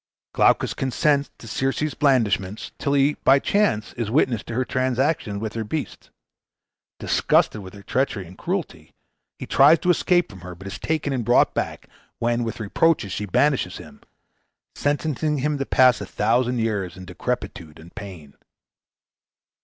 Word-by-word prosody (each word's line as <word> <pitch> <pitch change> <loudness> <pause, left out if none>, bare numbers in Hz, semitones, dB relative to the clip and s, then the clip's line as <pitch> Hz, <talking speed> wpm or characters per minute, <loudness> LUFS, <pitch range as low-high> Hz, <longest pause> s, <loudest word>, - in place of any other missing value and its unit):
Glaucus - - +3
consents 140 +2 +1
to 115 - -12
Circe's 135 +6 -1
blandishments, 110 -8 +1
till 140 - 0
he 140 +1 +3
by 135 - +6
chance 140 - 0
is 115 -3 -3
witness 120 -3 +2
to 115 - -6
her 130 +1 0
transactions 130 -2 0
with 110 0 -4
her 115 - -3
beasts. 150 +8 -5 0.9
Disgusted 110 - +2
with 95 +1 -11
her 100 - -12
treachery 115 -3 -1
and 90 +2 -13
cruelty, 155 - -5 0.4
he - - -7
tries 145 +4 +6
to 180 - +2
escape 175 -5 +2
from 95 - -12
her, 90 0 -8
but 95 +3 -13
is 100 0 -6
taken 155 -3 -1
and 125 -3 -1
brought 120 +2 +3
back, - - -4 0.3
when 120 0 0
with 115 0 -4
reproaches 110 - +1
she 105 +3 -3
banishes 140 +8 +1
him, - - -13 0.7
sentencing 150 +1 -1
him 145 +1 -1
to 135 - -2
pass 130 -1 +4
a - - -6
thousand 120 +3 +1
years 100 -6 -2
in 95 - -9
decrepitude 80 -2 -5
and 85 +2 -14
pain. 85 -8 -10
120 Hz, 160 wpm, -23 LUFS, 100-145 Hz, 0.9 s, by